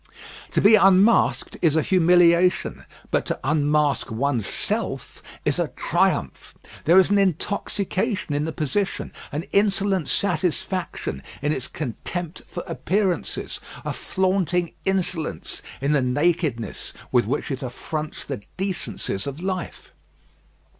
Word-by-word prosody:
To - - +3
be 205 +2 +7
unmasked 195 +2 +5
is 160 -3 +3
a 160 - +3
humiliation; 175 0 +4 0.3
but - - +2
to - - -2
unmask 150 0 +2
one's 120 0 0
self - - -3 0.2
is - - +2
a - - +1
triumph. - - 0 0.3
There 170 +4 +6
is 190 +1 +6
an 205 - +5
intoxication 195 - -1
in 145 +1 0
the 160 - -2
position, 160 +7 -2 0.2
an 150 +3 -3
insolent 195 -4 +2
satisfaction 185 - -1 0.2
in 150 +1 +2
its 130 - -2
contempt 160 - -4
for 175 - -6
appearances, 190 -2 -1 0.3
a - - -1
flaunting 185 -3 0
insolence 185 - -2 0.2
in 140 +2 +1
the 145 -2 +3
nakedness 140 - 0 0.2
with 120 -4 +3
which 145 +4 -2
it 130 - -3
affronts 150 +4 -4
the 135 -7 -5 0.2
decencies 185 - -2
of 140 +2 -5
life. 185 -2 -4
170 Hz, 125 wpm, -24 LUFS, 145-190 Hz, 0.3 s, be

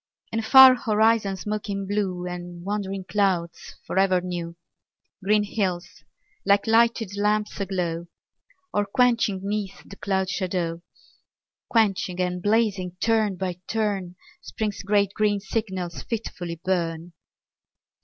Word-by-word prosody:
And 225 0 -1
far 265 +3 +9
horizons 215 -4 +1
smoking 205 -2 -3
blue 190 -3 -2
And 175 -1 -7
wandering 195 -1 -3
clouds 185 -5 -1
for - - -1
ever 190 -1 +3
new; 175 -2 -5 0.7
Green 210 +2 +3
hills, 185 -4 -3 0.4
like 200 0 +3
lighted 225 -2 +2
lamps 210 +1 0
aglow 175 -3 -2 0.7
Or 205 0 +1
quenching 230 -3 +2
'neath 200 -1 -4
the 200 - -11
cloud 190 -1 -1
shadow. 175 -3 -2 0.9
Quenching 195 -5 +1
and 180 0 -1
blazing 205 -4 0
turn 220 -3 +2
by 180 -1 -4
turn 200 -5 -2 0.3
Spring's 215 -2 -4
great 200 0 +1
green 210 -1 +1
signals 190 -4 -4
fitfully 180 -7 -5
burn. 170 -2 -2
195 Hz, 115 wpm, -24 LUFS, 180-210 Hz, 0.9 s, far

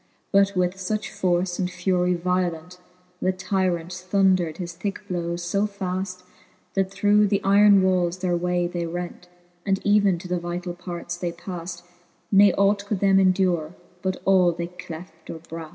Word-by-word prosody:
But 200 0 +3
with 180 0 +1
fuch 210 +3 -3
force 175 0 0
and 180 -1 0
furie 180 0 +1
violent, 180 -1 -2 0.4
The 185 - +2
tyrant 185 -2 -1
thundred 185 -3 +1
his 175 -2 -5
thicke 200 +3 -5
blowes 175 -1 -3
fb 200 +4 0
faft. 185 -1 -4 0.5
That 195 -1 +1
through 205 +1 +3
the 200 0 +1
yron 200 0 +6
walles 180 -1 +1
their 180 -1 0
way 175 0 0
they 175 -1 -3
rent,, 175 +1 -6 0.3
And 195 -1 +1
even 205 -3 +4
to 180 - -9
the 180 0 -1
vitall 175 +1 -4
parts 175 -1 -6
they 175 -1 -3
paft, 175 0 -7 0.5
Ke 200 0 +7
ought 200 +1 +3
could 200 -2 -1
them 195 0 +4
endure, 185 -4 +2 0.3
but 185 0 -1
all 185 -2 +5
they 170 0 -4
cleft 175 -1 -11
or - - -5
braft. 165 0 -9
180 Hz, 165 wpm, -24 LUFS, 175-195 Hz, 0.5 s, Ke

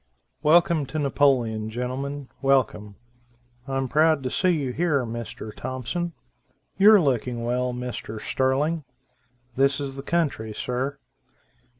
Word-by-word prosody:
"Welcome 160 -1 +4
to 155 - -5
Napoleon, 130 -7 +2
gentlemen, 130 +4 -4
welcome. 115 -7 +1 0.7
I 135 0 -2
am 135 -1 -1
proud 155 +1 +3
to 130 - -2
see 185 - +2
you 145 -7 0
here 150 -5 +1
Mr. 115 -2 -6
Thompson. 130 +7 -4 0.6
You 205 +3 +7
are, 210 - +8
looking 125 - 0
well 125 +1 0
Mr. 125 -3 -5
Sterling. 140 +7 0 0.7
This 140 +2 +2
is 135 -1 -4
the - - -4
country, 140 -9 -1
sir. 130 +3 -2
135 Hz, 125 wpm, -25 LUFS, 125-150 Hz, 0.7 s, are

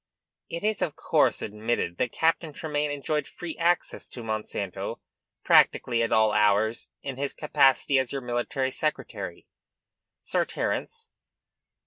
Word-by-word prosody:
"It 170 +2 -5
is 215 -1 0
of 155 - -1
course - - +2
admitted 105 -4 -2
that 120 - 0
Captain 165 -1 +1
Tremayne 150 -1 -2
enjoyed 145 +1 -2
free 175 -2 -7
access 170 +1 +1
to 120 - -9
Monsanto 105 -3 -4 0.4
practically 120 -2 +4
at 115 - 0
all 110 -1 +4
hours 105 +2 +2
in 135 -2 -5
his 140 +1 -3
capacity 140 -2 +3
as 130 -2 -2
your 140 - -3
military 125 +2 -1
secretary, 155 +3 -3 0.7
Sir - - 0
Terence?" 460 0 -3
135 Hz, 130 wpm, -27 LUFS, 115-155 Hz, 0.7 s, practically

